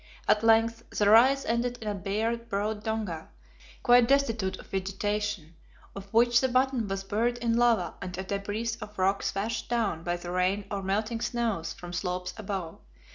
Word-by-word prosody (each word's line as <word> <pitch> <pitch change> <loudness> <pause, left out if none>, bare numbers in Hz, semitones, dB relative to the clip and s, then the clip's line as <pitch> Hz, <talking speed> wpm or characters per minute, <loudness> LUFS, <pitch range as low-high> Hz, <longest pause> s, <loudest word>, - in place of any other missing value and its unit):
At 210 0 +4
length 225 0 +4
the 205 - +1
rise 260 +5 +6
ended 240 +1 0
in 220 - -7
a 210 - 0
bare, 210 +4 -1
broad 215 -2 -3
donga, 215 -8 -3 0.5
quite 245 -1 +6
destitute 230 -9 +1
of - - -12
vegetation, 195 -2 -3 0.4
of 195 0 -9
which 240 +1 +4
the 260 - +1
bottom 255 -2 +1
was 195 0 -3
buried 230 +5 0
in 235 -1 0
lava 230 -8 +2
and 180 0 -6
a 190 - -3
debris 205 +4 -3
of 210 0 -9
rocks 190 +1 +1
washed 215 +3 -2
down 220 -9 0
by 175 0 -1
the 175 0 -7
rain 185 +3 0
or 200 -1 -2
melting 215 +4 -1
snows 225 -11 -1
from 175 -2 -9
slopes 180 0 -3
above. 190 -6 -5
210 Hz, 175 wpm, -28 LUFS, 190-230 Hz, 0.5 s, rise